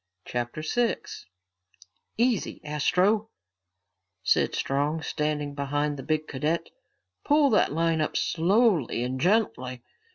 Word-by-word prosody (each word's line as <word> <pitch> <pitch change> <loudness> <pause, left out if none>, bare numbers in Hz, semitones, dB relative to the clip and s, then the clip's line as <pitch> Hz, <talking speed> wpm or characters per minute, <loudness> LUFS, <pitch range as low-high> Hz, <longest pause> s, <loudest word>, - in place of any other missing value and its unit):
CHAPTER 120 +5 -4
6 230 - -2 0.9
"Easy, 235 -2 +1
Astro," 185 +8 +1 0.9
said - - +2
Strong, 145 +4 -1
standing 150 -2 -2
behind 145 +1 -1
the 135 - -7
big 155 +2 -1
cadet. 150 +5 -2 0.5
"Pull 290 -2 +4
that 210 - +3
line 165 +1 +1
up 155 - -1
slowly 175 - +2
and 130 +1 -3
gently." 130 - 0
155 Hz, 105 wpm, -27 LUFS, 140-200 Hz, 0.9 s, Pull